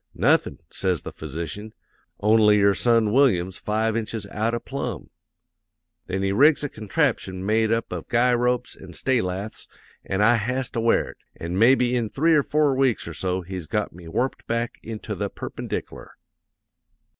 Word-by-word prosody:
"'"Nothin'," - - +2
says 90 -6 -1
the - - -6
physician, 85 +8 -6 0.5
"only 105 0 +5
your 100 0 +4
son 115 -1 +2
Willyum's 95 -9 +2
five 110 +1 0
inches 115 -1 -3
out 110 +3 0
o' - - -2
plumb." 140 +3 -5 1.0
"'Then 95 +1 -2
he 95 - +1
rigs 145 +9 +4
a 145 - -2
contraption 95 -3 -1
made 110 +1 +2
up 115 0 -1
of - - -5
guy 125 +1 +3
ropes 125 0 0
an' 90 -2 -12
stay 130 +6 +1
laths, 95 +3 -5 0.4
an' 95 +1 -2
I 115 +2 +5
has 125 +4 -2
to 115 - -2
wear 115 0 +2
it; - - -22 0.2
an' 85 +2 -5
mebby 125 +3 +4
in 115 -3 0
three 160 +8 +2
or 150 - +5
four 150 0 +2
weeks 130 -7 +1
or 85 - -6
so 90 +3 -2
he's 90 -2 -6
got 105 -2 -2
me 85 0 -12
warped 125 +11 -2
back 115 0 -2
into 110 -1 -6
the 100 +1 -3
perpendic'lar.' - - -6
110 Hz, 170 wpm, -24 LUFS, 95-120 Hz, 1.0 s, only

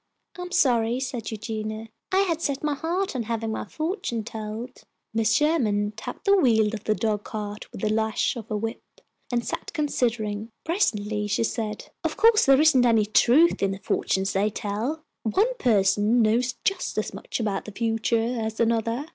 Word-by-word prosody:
"I'm 360 0 -7
so - - +1
sorry," 235 0 +1
said 250 -4 -4
Eugenia; 220 0 -5 0.2
"I 380 +1 +4
had 335 -4 0
set 280 -3 -2
my 300 -1 +1
heart 340 +4 -2
on 250 - 0
having 225 0 -2
my - - -3
fortune 315 - -3
told." 220 +2 -7 0.3
Mrs. 225 0 +3
Sherman 225 -10 +1
tapped 220 - -8
the 400 0 +6
wheel 225 - +3
of 220 -1 -6
the 215 - +2
dog 210 -2 -1
cart 210 -1 -6
with - - -9
the 215 - +1
lash 220 +4 0
of 225 -3 -7
her 215 - -1
whip, 225 +2 -4 0.5
and 240 -1 0
sat - - -4
considering. 230 -7 -1
Presently 210 - 0
she 205 +2 +1
said, 220 -2 -3
"Of - - -2
course 450 -5 +5
there 270 0 +6
isn't 300 -5 +5
any 225 -3 +4
truth 250 +10 +4
in 195 - +2
the 195 - -3
fortunes 190 0 0
they 200 +2 +2
tell. 220 +10 -3 0.2
One 410 - +1
person 210 0 +3
knows 245 +3 +1
just 390 - -1
as - - -2
much - - -5
about 205 -4 -2
the 210 - -7
future 230 +2 0
as 220 0 -4
another. 230 +3 +1
225 Hz, 180 wpm, -25 LUFS, 215-270 Hz, 0.5 s, the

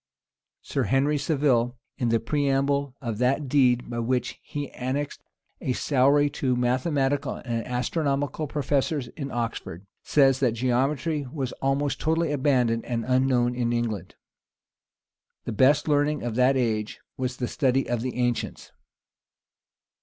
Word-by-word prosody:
Sir - - -1
Henry 145 +3 +2
Saville, 130 -5 +1 0.2
in 120 - +1
the 115 0 +3
preamble 140 +1 0
of 115 -3 -3
that 135 +3 +1
deed 125 -3 +3
by 120 -1 -4
which 125 +1 -1
he 145 -2 -6
annexed 135 +3 -3 0.4
a 130 - 0
salary 140 +2 +3
to 135 -3 -1
the - - -2
mathematical 135 +2 0
and 115 -2 -3
astronomical 140 +4 -1
professors 140 -1 -1
in 140 -3 -6
Oxford, 115 -7 -4 0.2
says, 135 -3 +3
that 125 -4 +2
geometry 135 +5 0
was 135 -5 -3
almost 135 +1 0
totally 160 0 +1
abandoned 125 -5 +2
and 115 -2 -3
unknown 125 -1 +2
in 120 -1 -1
England.[*] 110 -6 -2 1.3
The - - -3
best 140 +7 +3
learning 145 -1 +1
of 120 -2 -2
that 130 +3 +3
age 110 -4 -1 0.2
was 125 -1 -3
the 125 - -2
study 135 -2 +1
of 120 -2 -1
the 130 +1 -3
ancients. 120 -1 -2
130 Hz, 140 wpm, -26 LUFS, 120-145 Hz, 1.3 s, the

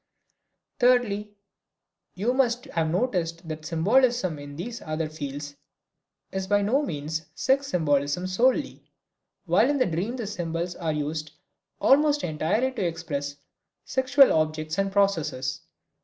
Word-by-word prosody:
Thirdly, 220 -5 +2 0.8
you 220 +7 0
must 245 -2 +1
have 160 -1 -1
noticed 170 -4 -1
that 155 0 -6
symbolism 200 - +2
in 145 0 -9
these 225 +9 -6
other 155 0 -2
fields 145 -1 -6 0.7
is 190 0 -3
by 205 0 +3
no 250 +8 +2
means 155 - -4
sex 270 +8 +1
symbolism 145 - +1
solely, 230 +8 +1 0.6
while - - +4
in 290 - +1
the 255 - +3
dream 185 +8 -2
the 240 -4 -4
symbols 175 -3 -3
are 165 -3 -2
used 150 +1 -3 0.5
almost 295 +1 +4
entirely 175 +11 0
to 255 - -3
express 150 -4 -3 0.5
sexual 260 +1 +4
objects 155 +2 0
and 195 0 +1
processes. 160 -9 0
175 Hz, 125 wpm, -26 LUFS, 155-240 Hz, 0.8 s, while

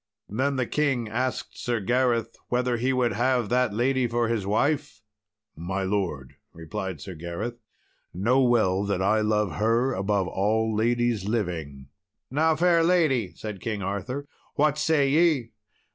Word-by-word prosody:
Then 135 +7 0
the 130 -1 0
king 135 -4 0
asked 125 +4 -3
Sir 120 -2 -1
Gareth 120 +1 +1
whether 125 0 +1
he 125 +3 0
would 125 -3 +1
have 120 0 +1
that 125 -2 +2
lady 125 +3 +1
for 120 0 0
his 110 -4 -1
wife? 110 -1 0 0.5
"My 95 +4 -3
lord," 95 -10 -2 0.2
replied 85 +1 -5
Sir 90 +7 -8
Gareth, 85 +9 -5 0.5
"know 120 +9 +2
well 110 -7 +3
that 100 -2 -1
I 110 +3 +3
love 105 -6 0
her 115 +5 +2
above 100 -1 0
all 110 +3 0
ladies 120 -2 +1
living." 80 - -3 0.4
"Now, 160 +3 +2
fair 170 +1 +3
lady," 140 - +2
said 105 -4 -7
King 105 -3 -3
Arthur, 125 +9 -4 0.3
"what 150 0 +2
say 150 -3 +3
ye?" 150 -4 +2
115 Hz, 145 wpm, -26 LUFS, 100-130 Hz, 0.5 s, well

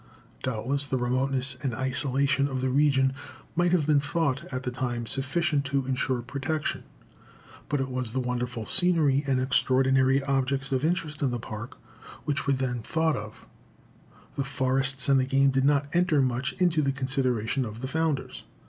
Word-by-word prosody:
Doubtless 130 +3 -1
the 135 -2 -2
remoteness 130 +2 0
and 130 -5 -2
isolation 135 +2 +1
of 130 -2 -3
the 130 0 0
region 135 -1 +3 0.4
might 175 0 +2
have 175 -5 +2
been 150 -1 +4
thought, 145 -1 -1
at 130 -1 -3
the 125 - -2
time, 120 -2 -3
sufficient 140 +3 0
to 140 -1 -1
insure 130 -1 -1
protection. 140 +5 -3 0.8
But 145 -2 0
it 135 - -1
was 125 -2 -2
the 130 +4 -2
wonderful 125 -2 -3
scenery 160 - +3
and 130 -2 +2
extraordinary 130 +1 +3
objects 135 0 0
of 130 0 0
interest 160 -2 -1
in 140 - +2
the 120 - -2
Park 115 +2 -7 0.5
which 145 -1 -1
were 140 - +4
then 130 -2 -2
thought 160 +6 0
of; 105 +1 -8 0.9
the 140 - -1
forests 135 -1 0
and 135 -1 +5
the 130 - +1
game 135 +1 +3
did 135 0 +1
not 145 0 +3
enter 175 -3 +3
much 130 -1 0
into 175 -4 +2
the 140 -2 +1
consideration 130 -2 -1
of 110 0 -7
the 130 - -3
founders. 160 -1 -2
135 Hz, 170 wpm, -27 LUFS, 130-140 Hz, 0.9 s, and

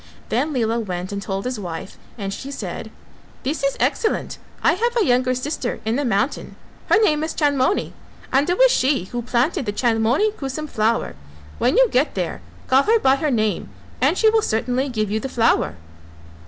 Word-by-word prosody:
Then 270 +7 0
Lela 235 -4 0
went 185 -4 -4
and 200 0 -4
told 195 +1 -4
his 250 -3 -3
wife 175 -1 -6 0.2
and 195 -2 -4
she 275 - -7
said, 280 - -6 0.5
"This 280 +3 -2
is 275 0 0
excellent: 440 - 0 0.2
I - - +5
have 475 +6 0
a 450 - +3
younger 255 0 +2
sister 255 -1 -3
in 220 +1 0
the 285 - 0
mountain, 225 +1 -1 0.3
her 430 - +5
name 305 -6 +2
is 320 - -3
Chandmoni 285 +3 +1 0.4
and 275 +5 +3
it 355 - +1
was - - +6
she 265 -6 +2
who 240 - -2
planted 250 - 0
the - - +1
Chandmoni 235 - +2
Kusum 305 -5 -5
flower; 225 -3 0 0.5
when 250 - +2
you - - +6
get 265 +5 +1
there - - -3 0.2
call 265 +1 +4
her 445 +9 +3
by 270 -9 +3
her 300 +2 0
name 215 -5 0 0.3
and - - +3
she 445 - +4
will 440 0 +4
certainly 250 - 0
give 215 -4 -2
you 215 - 0
the 270 - -5
flower." 230 - +2
255 Hz, 190 wpm, -21 LUFS, 225-300 Hz, 0.5 s, was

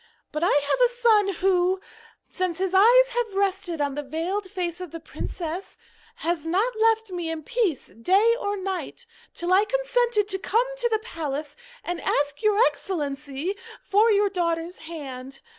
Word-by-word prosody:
But 305 +2 -2
I - - +4
have 290 +8 +2
a - - +7
son 450 -4 +4 0.2
who, 370 0 +3 0.5
since 365 -3 -2
his 380 0 -1
eyes 485 +6 +6
have 475 -4 -2
rested 385 -4 0
on 285 -1 0
the 295 - -3
veiled 340 +8 -3
face 355 -2 -3
of 365 - -6
the 330 - -7
princess, 335 +2 -6 0.4
has 335 -2 -2
not 395 +9 0
left 445 -1 +2
me 350 -2 -3
in 325 -1 -4
peace 430 - -1
day 390 - +3
or 405 -2 -2
night 385 +5 -4 0.3
till 350 +2 0
I 390 +2 +6
consented 485 -2 +1
to 385 -1 -1
come 455 +5 +2
to 480 -1 +1
the 440 - +2
palace, 300 - -4 0.3
and 350 0 -3
to - - -8
ask 285 0 0
your 425 -2 +3
Excellency 295 - -3 0.2
for 425 +3 +3
your 410 -1 +4
daughter's 340 -1 -1
hand. 275 -5 -8
370 Hz, 170 wpm, -25 LUFS, 325-425 Hz, 0.5 s, a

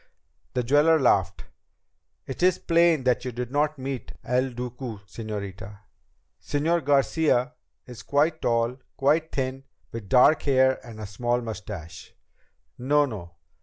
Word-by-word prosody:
The 125 - +1
jeweler 145 +6 +4
laughed. 100 - +2 0.8
"It 135 - -7
is 180 0 +4
plain 170 -4 +3
that 125 -1 +1
you 130 - -4
did 125 +1 -5
not 150 +2 0
meet 135 -1 -5
El 125 +2 0
Duque, 120 -3 -7
señorita. 100 -1 -7 0.6
Señor 160 +3 0
Garcia 145 0 +2 0.3
is 120 -2 -10
quite 155 +3 +1
tall, 115 +2 0 0.2
quite 155 +4 +2
thin, 135 0 -3 0.3
with 110 -4 -8
dark 130 +5 +5
hair 130 -1 +2
and 115 -3 -11
a 110 - -5
small 120 +5 -1
mustache. 105 -7 -8 0.6
No, 145 +4 +3
no. 90 -9 -8
125 Hz, 130 wpm, -25 LUFS, 115-145 Hz, 0.8 s, dark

